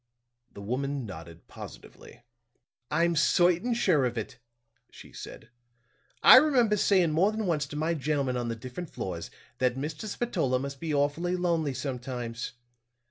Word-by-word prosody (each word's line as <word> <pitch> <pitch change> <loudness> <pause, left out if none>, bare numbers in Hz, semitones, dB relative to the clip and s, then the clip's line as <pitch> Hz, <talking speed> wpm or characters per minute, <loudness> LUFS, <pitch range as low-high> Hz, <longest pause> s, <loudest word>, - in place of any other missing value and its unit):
The 100 - -10
woman 135 +4 -2
nodded 85 -4 -10
positively. - - -12 0.7
"I'm 170 0 +2
certain 175 +8 +3
sure 175 - +3
of 120 -1 -2
it," 115 +2 -5 0.5
she - - -14
said. 110 - -10 0.7
"I - - +11
remember 255 -7 +4
saying 190 -5 +3
more 180 +7 +3
than 220 0 -3
once 155 -6 0
to 145 - -9
my 160 +3 0
gentlemen 140 -3 -1
on 120 -1 -2
the 115 - -2
different 130 +9 -7
floors, 85 -3 -5 0.3
that 125 -1 +2
Mr. 150 +8 -5
Spatola 180 - 0
must 140 +1 -5
be 165 -2 -3
awfully 145 +5 0
lonely 165 -6 0
sometimes. 125 -3 -5
145 Hz, 145 wpm, -28 LUFS, 125-175 Hz, 0.7 s, I